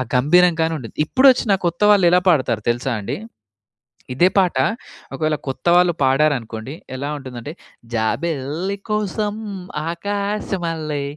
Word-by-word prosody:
గంభీరం 175 +7 +5
గానుంటది. 160 -8 -2
ఇపుడొచ్చిన 255 - +4
కొత్త 170 0 -1
వాళ్లేలా 180 -3 +5
పాడతారో 130 -9 +2
తెలుసా 120 +2 -1
అండి! 100 - -4 1.0
ఇదే 175 +7 +4
పాట 185 -2 +2 0.6
ఒకవేళ 155 +2 0
కొత్తవాళ్ళు 175 +6 +3
పాడారనుకోండి 135 -3 0 0.2
ఎలా 140 +2 -4
ఉంటుందంటే 130 +1 -8 0.4
జాబెల్లి 155 - -2
కోసం 210 0 -1 0.6
ఆకాశమల్లె 175 -6 -3
160 Hz, 95 wpm, -20 LUFS, 135-185 Hz, 1.0 s, గంభీరం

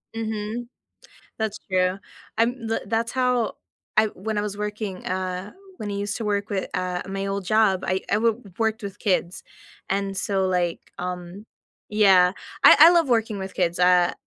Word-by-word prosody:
Mhm. 220 +1 -4 0.7
That's 220 -2 -2
true. 185 +1 +1 0.4
I'm 230 0 0
the 225 - -1
that's 230 +1 0
how 250 -3 +1 0.4
I 215 0 +6
when 215 +1 -5
I - - +1
was 205 -1 -4
working, 210 -2 -4
uh 185 +1 -3 0.3
when 210 - -5
I - - -3
used 205 +2 -2
to 225 - -4
work 205 0 -1
with, 190 -2 -1
uh, 180 -1 -2
my 195 0 -3
old 195 -1 -3
job, 210 -2 +3
I 185 0 0
I 205 - +4
wo 230 0 +3
w 240 - -17 0.2
worked 220 -1 0
with 200 0 -7
kids, 180 -2 -1 0.5
and 195 0 -1
so, 195 -2 0
like, 180 -2 -1
um 180 +3 -6 0.4
Yeah, 190 -3 +5 0.3
I - - +10
I 320 +3 +11
love 335 -6 +3
working 225 -3 +1
with 190 0 -6
kids, 175 -1 0
uh, 180 -1 +4
200 Hz, 175 wpm, -24 LUFS, 185-220 Hz, 0.7 s, I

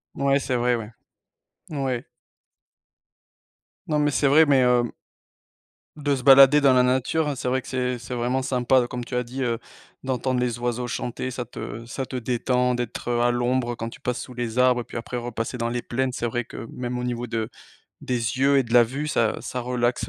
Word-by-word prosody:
Ouais, 140 0 +2
c'est 130 -1 -2
vrai, 120 0 +2
ouais, 115 -1 -6 0.8
ouais. 135 -5 -2 1.8
Non 150 -1 +1
mais 145 0 +2
c'est 145 - +2
vrai, 155 +4 +6
mais 140 -3 +4
hem 125 -1 +3 1.1
de 145 -1 0
se 130 - -5
balader 135 +2 +8
dans 135 -2 +5
la 125 0 +5
nature, 130 +4 +1
c'est 130 - -4
vrai 130 +1 +1
que - - -13
c'est 125 -1 -1
c'est 125 +2 -7
vraiment 125 +2 0
sympa, 125 -1 +2
comme 125 0 -5
tu 125 - -6
as 125 - +1
dit: 125 +3 -6
«Heu, 120 -2 0 0.5
d'entendre 130 -1 -1
les 125 -1 -1
oiseaux 120 0 -2
chanter, 120 +1 -3
ça 125 0 -4
te 115 -1 -7
ça 130 +3 -4
te 130 - -8
détend» 125 +1 0
d'être, 120 0 -4
heu, 120 0 +1
à 120 0 +3
l'ombre 120 0 0
quand 115 0 -5
tu - - -12
passes 125 0 -2
sous 125 - -9
les 120 0 -3
arbres 125 -1 +4
et - - -6
puis, - - -8
après 120 +1 -5
repasser 120 0 -4
dans 115 -1 -1
les 120 0 -2
plaines, 130 +2 -1
c'est 120 - -2
vrai 120 +1 -2
que 115 - -8
même 125 0 -4
au - - -3
niveau 120 -1 -2
de 115 -1 -2 0.5
des 125 - -2 0.2
yeux 140 +1 +4
et - - +4
de 115 -2 -8
la 120 0 +8
vue 135 +6 -3
ça 115 -6 +1
ça 125 - -4
relaxe, 125 0 -1
125 Hz, 210 wpm, -24 LUFS, 120-130 Hz, 1.8 s, balader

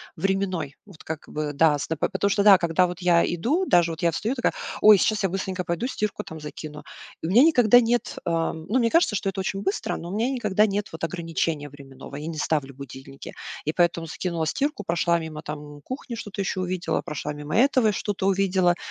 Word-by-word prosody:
временной. 190 -7 -1
Вот 195 -6 -15
как 160 -1 -6
бы 150 -1 -3
да, 150 0 +4
с 145 - -5
на 160 - -1
по - - +1
потому 200 - 0
что 200 +1 +2
да, 200 -2 +8
когда 175 +1 +2
вот 180 +1 -7
я 175 -1 +4
иду, 260 - 0
даже 175 - +3
вот 160 - -7
я 170 -1 +3
встаю 215 +9 -2
такая: 245 - 0 0.3
"Ой, 210 -1 +8
сейчас 215 +2 +1
я 195 - +2
быстренько 185 0 -3
пойду 195 +9 -2
стирку, 210 -5 -3
там, 160 - -9
закину". 150 0 -8 0.4
И - - -3
у - - -2
меня 230 +8 +6
никогда 245 -7 +6
нет, 235 +1 -1
ам, 165 -1 -1
ну, 250 +5 +2
мне 230 -2 +2
кажется, 335 -4 +3
что 195 - -4
это 195 0 -2
очень 195 +1 -3
быстро, 195 +1 -2
но 170 - -7
у 190 - -4
меня 235 +4 +1
никогда 215 -5 +2
нет 205 0 -2
вот 160 - -8
ограничения 165 -3 -2
временного. 135 -1 -12
Я 150 +2 -6
не 165 -1 -5
ставлю 145 -3 -1
будильники. 135 0 -10 0.3
И 155 - -1
поэтому 170 -1 +1
закинула 165 0 -3
стирку, 280 - -2
прошла 170 0 +2
мимо, 160 -2 -7
там, 150 -1 -8
кухни, 255 - -6
что-то 210 -3 -8
ещё 190 -1 -2
увидела, 180 -1 -1
прошла 150 0 -5
мимо 150 +4 -4
этого 255 -2 +4
и - - +2
что-то 205 -1 -3
увидела. 190 -2 +2
180 Hz, 220 wpm, -25 LUFS, 160-205 Hz, 0.4 s, да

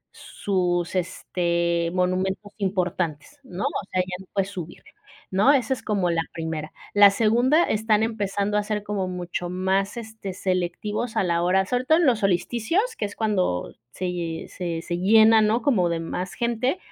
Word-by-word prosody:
sus, 180 -2 -1
este, 170 -1 0
monumentos 185 +2 -1
importantes, 180 - -2
¿no?, 190 -4 -6
o - - -2
sea, 185 - 0
ya 180 0 -4
no 190 - -13
puedes 195 -1 0
subir, 175 -3 -8 0.5
¿no?, 205 +10 +5
esa 265 -1 +2
es - - -6
como 190 -5 0
la 165 -1 +1
primera. 160 -2 -4 0.2
La 205 -1 +8
segunda, 240 - +3
están 220 -3 +1
empezando 205 -2 -1
a 210 - +1
ser 210 0 -3
como 200 -3 -2
mucho 175 -1 -4
más, 190 +4 0
este, 220 -4 -7
selectivos 195 +5 -2
a - - +3
la 170 -1 +1
hora 190 +2 +2
sobre 250 +5 -1
todo 315 +3 +5
en 345 - +3
los 240 -5 +3
solsticios, 235 - 0
que 210 - -2
es 200 - -7
cuando 190 - 0 0.2
se 185 - -5
ll 170 -2 -4
se 170 -2 -4
se 175 -1 -3
llena, 220 +3 +6
¿no?, 220 +3 +2
como 205 -12 +2
de 170 -1 -1
más 180 +3 -4
gente 240 +6 0
190 Hz, 175 wpm, -24 LUFS, 180-220 Hz, 0.5 s, La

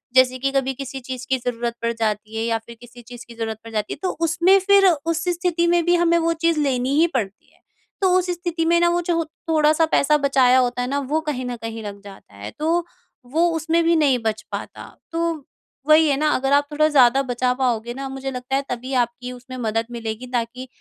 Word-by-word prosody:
जैसे 255 0 +5
कि 275 +1 0
कभी 270 -1 0
किसी 270 0 -7
चीज 255 0 -7
की 260 - +2
ज़रूरत 235 -1 -3
पड़ 230 0 0
जाती 215 0 -2
है 225 - -1
या 230 -1 0
फिर 235 - -11
किसी 240 0 -13
चीज़ 240 +1 -11
की 235 - -12
ज़रूरत 225 -1 -4
पड़ 230 - -10
जाती 215 -1 -2
है। - - -9
तो 370 - +1 0.2
उसमें 345 +4 +4
फिर 400 -1 +6
उस 330 +1 -1
स्थिति 345 -1 0
में 345 0 +3
भी 350 - +4
हमें 340 0 +3
वो 335 0 +1
चीज़ 335 -2 +2
लेनी 265 -2 0
ही 335 - +5
पड़ती 205 -6 -4
है - - -29 0.4
तो 375 -2 +3
उस 365 0 -1
स्थिति 345 -1 -2
में 340 +1 +3
ना 345 - +4
वो 345 0 +1
जो 335 -1 0 0.3
थोड़ा-सा 310 +1 +3
पैसा 300 +2 +3
बचाया 260 -2 +4
होता 245 0 0
है 250 - -2
ना 280 +2 -1
वो 310 +2 +1
कहीं 290 -5 -3
न 245 -1 -4
कहीं 225 0 -6
लग 200 -1 -8
जाता 195 - -14
है। 100 +1 -8
तो 335 +3 +1 0.5
वो 335 +2 +3
उसमें 325 +1 +1
भी 335 0 +3
नहीं 285 -5 +3
बच 220 -1 -1
पाता। - - -6 0.3
तो 335 0 0 0.6
वही 310 +1 +6
है 275 - +1
ना 305 - +1
अगर 270 +1 0
आप 285 0 +3
थोड़ा 305 +1 +3
ज़्यादा 265 -2 +5
बचा 250 +1 +1
पाओगे 240 -2 -1
ना 270 +1 -6
मुझे 270 0 -5
लगता 250 +1 -3
है 275 - +1
तभी 250 +2 -5
आपकी 245 +1 -7
उसमें 250 +1 -10
मदद 225 -1 -1
मिलेगी 230 +1 -5
ताकि 245 +2 -3
265 Hz, 230 wpm, -22 LUFS, 240-325 Hz, 0.6 s, फिर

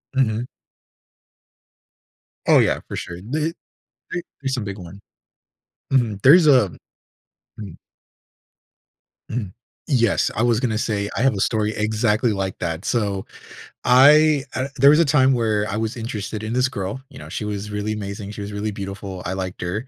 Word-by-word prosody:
Mhm. 120 -2 +1 2.0
Oh, - - +6
yeah, - - +2
for - - -6
sure. 85 - -6
The 150 +9 -2 0.6
the 175 - -3 0.2
is 135 -1 -1
a - - -2
big 100 -2 -5
one. 90 +2 -11 0.9
Mhm. 115 -7 +1
There's 155 +4 +7
a 125 - +5 0.9
mm. 100 -6 -8 1.5
Mhm, 110 -6 -4 0.3
yes. 120 -8 +2
I 110 - +1
was 120 -2 +3
gonna 120 -4 -1
say, 105 -3 -1
I - - -1
have 130 -2 +3
a - - -3
story 110 0 0
exactly 110 +1 +1
like 95 -1 -3
that. 85 0 -3
So, 100 -5 -1 0.6
I 145 +3 +6
uh, 130 +1 -1
there 140 +2 +7
was 150 +2 +6
a 170 - +5
time 135 -2 +4
where 110 -3 0
I 100 - -2
was 110 0 -2
interested 110 -2 -5
in 110 +1 -3
this 125 +1 +2
girl, 125 +1 -5
you - - -12
know, - - -10
she 105 - -4
was 105 0 -4
really 105 +1 -2
amazing, 100 -1 -6
she 105 - -7
was 100 +1 -6
really 105 +1 -3
beautiful, 100 -1 -6
I 90 - -2
liked 95 -1 -5
her. 100 +8 -3
110 Hz, 165 wpm, -22 LUFS, 100-125 Hz, 2.0 s, There's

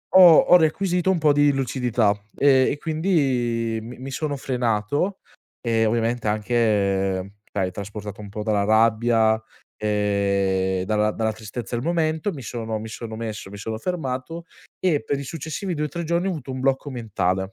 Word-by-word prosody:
ho 175 -4 +10
ho - - +6
requisito 180 +3 +1
un 185 - +1
po' 150 -2 +4
di 145 0 +4
lucidità 125 -5 +1 0.2
e 135 -2 +5
e 145 - -3
quindi 130 -9 0
mi 120 +3 -9
mi 135 +2 -7
sono 145 +1 -2
frenato 125 - -1 0.4
e 115 -2 +1
ovviamente 115 +1 0
anche, 100 -4 +1 0.2
dai 95 -2 -1
trasportato 105 +1 -7
un 100 - -9
po' 105 +2 -6
dalla 105 -2 +1
rabbia, 110 +1 +3 0.4
ehm, 100 -3 0
dalla 105 0 +1
dalla 110 0 -1
tristezza 110 +1 -6
del 120 - -3
momento, 165 +2 0
mi 145 - -8
sono 110 -2 -4
mi 110 - -7
sono 110 0 -7
messo 110 -3 -5
mi 100 - -9
sono 110 +2 -4
fermato 165 +1 -4 0.3
e 165 -6 +1
per 140 - -2
i 140 - -5
successivi 165 +5 -4
2-3 150 +3 -3
giorni 170 +3 0
ho - - +1
avuto 140 -5 -6
un 130 - -4
blocco 135 +2 0
mentale. 105 -7 -1
120 Hz, 165 wpm, -23 LUFS, 105-145 Hz, 0.4 s, ho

